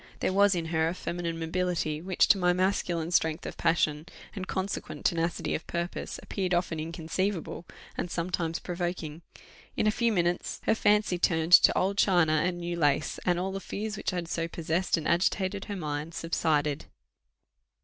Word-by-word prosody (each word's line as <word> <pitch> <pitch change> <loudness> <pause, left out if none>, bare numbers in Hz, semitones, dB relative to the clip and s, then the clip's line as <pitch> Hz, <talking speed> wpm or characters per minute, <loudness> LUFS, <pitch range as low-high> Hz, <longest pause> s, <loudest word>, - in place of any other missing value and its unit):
There - - 0
was 200 0 +5
in 170 -2 -2
her 160 0 +2
a 170 - -2
feminine 170 -2 -3
mobility, 165 -2 -1
which, 185 +1 +2
to 195 - +6
my 180 -1 +3
masculine 175 -3 0
strength 160 -2 +1
of - - -5
passion, 160 -2 +1 0.3
and 190 -2 -5
consequent 190 +1 -4
tenacity 170 0 0
of - - -4
purpose, 170 0 -4
appeared 185 -3 -1
often 175 -2 -1
inconceivable, 170 +3 -3 0.3
and 175 - -3
sometimes 170 -1 -2
provoking. 175 -3 -4 0.6
In - - +2
a 215 - +4
few 235 +1 +1
minutes 175 -3 0
her - - +3
fancy 210 -4 +2
turned 165 0 +1
to - - +8
old 195 +2 +1
china 160 -5 +4
and 175 0 -1
new 175 0 -3
lace, 145 -2 +1
and 175 -1 +3
all 190 +2 -2
the 195 - -4
fears 210 +2 -4
which - - -2
had 175 -3 -3
so 165 0 -2
possessed 170 +2 0
and 160 - -3
agitated 190 +2 +1
her 205 - -5
mind 155 -1 -4
subsided. 150 -3 0
175 Hz, 170 wpm, -28 LUFS, 165-185 Hz, 0.6 s, to